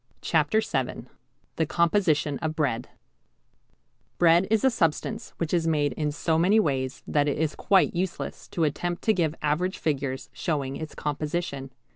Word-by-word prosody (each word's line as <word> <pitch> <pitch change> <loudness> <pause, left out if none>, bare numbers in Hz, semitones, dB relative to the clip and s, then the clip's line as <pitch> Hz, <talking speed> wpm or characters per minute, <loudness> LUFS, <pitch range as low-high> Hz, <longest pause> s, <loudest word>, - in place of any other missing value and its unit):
CHAPTER 160 +7 +2
VII 135 - -2 0.5
THE 160 - +1
COMPOSITION 165 -5 +2
OF 160 -1 -2
BREAD 130 -7 -1 1.3
Bread 175 +2 +5
is 220 -1 +2
a 265 - +5
substance 215 +3 -1
which 165 -1 -2
is 165 -2 +2
made 150 -3 +1
in 150 -1 -1
so 160 +2 0
many 195 +6 +4
ways 135 -8 -1
that 145 -1 +1
it 145 - 0
is 155 0 0
quite 195 -2 +3
useless 180 +1 -3
to 170 - -2
attempt 175 +4 -1
to 220 - +4
give 165 -5 0
average 175 +6 0
figures 140 -3 -2
showing 140 -4 -2
its 155 +1 -7
composition. 150 -2 -3
160 Hz, 155 wpm, -26 LUFS, 145-175 Hz, 1.3 s, Bread